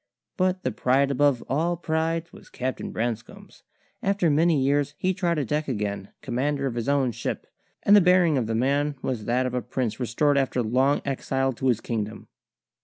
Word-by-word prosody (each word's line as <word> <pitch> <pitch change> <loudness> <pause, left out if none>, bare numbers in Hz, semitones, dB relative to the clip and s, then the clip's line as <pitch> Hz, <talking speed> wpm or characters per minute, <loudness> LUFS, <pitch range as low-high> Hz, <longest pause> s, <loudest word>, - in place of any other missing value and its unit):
But 185 -1 0
the 130 - 0
pride 130 +4 +2
above 140 -2 +2
all 165 +6 0
prides 165 0 -2
was - - -15
Captain 130 +1 -4
Branscome's. 115 0 -5 0.4
After 195 -5 +1
many 160 +1 +3
years 145 +2 +1
he 185 0 0
trod 175 -3 0
a 145 - 0
deck 150 +5 -1
again, 105 -5 -3
commander 140 +3 -1
of 130 - -1
his 120 +2 -2
own 140 -3 +2
ship; - - -4 0.4
and 205 - +6
the 205 - +8
bearing 180 -3 +4
of 125 -5 0
the 115 - -1
man 140 +4 +1
was 120 -5 -3
that 125 +2 +1
of 125 - -2
a 125 - 0
prince 125 -1 -3
restored 140 +4 +2
after 130 -2 0
long 130 +6 +2
exile 135 -1 -1
to 130 +2 -2
his 120 -4 +2
kingdom. 110 -2 -4
135 Hz, 185 wpm, -25 LUFS, 125-155 Hz, 0.4 s, the